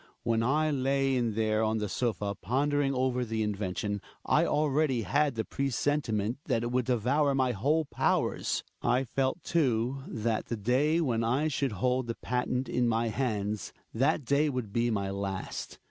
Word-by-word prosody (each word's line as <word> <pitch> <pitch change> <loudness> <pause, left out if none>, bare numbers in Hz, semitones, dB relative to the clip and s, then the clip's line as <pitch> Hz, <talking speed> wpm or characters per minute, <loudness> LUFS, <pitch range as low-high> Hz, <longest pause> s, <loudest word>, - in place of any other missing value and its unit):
When 115 -1 +1
I 150 +6 +2
lay 135 0 +1
in 120 -4 0
there 110 -1 +1
on 110 0 +1
the 105 -1 -1
sofa 105 -2 -1
pondering 140 +7 0
over 125 -1 +1
the 110 -2 -1
invention, 100 0 -2 0.2
I - - +3
already 145 -4 +1
had 140 +7 +1
the 110 - -2
pre 140 0 -2
sentiment 120 -5 0
that 115 - 0
it 120 - -2
would 125 -1 +1
devour 130 +4 +2
my 130 -2 +2
whole 145 +9 +1
powers. - - 0 0.2
I 125 +2 +2
felt, 135 +6 -1
too, 130 -4 +1
that 110 0 -2
the 115 - -3
day 135 +10 +2
when 120 -7 0
I 130 +7 +1
should 135 -4 -1
hold 125 +5 0
the 115 - -3
patent 125 +1 -1
in 125 -1 +1
my 115 0 +1
hands 105 -4 -2
— - - -41
that 140 +4 +1
day 140 +4 +2
would 125 -7 -4
be 120 0 +2
my 100 -3 -1
last. 100 -1 -4
125 Hz, 175 wpm, -29 LUFS, 110-135 Hz, 0.2 s, I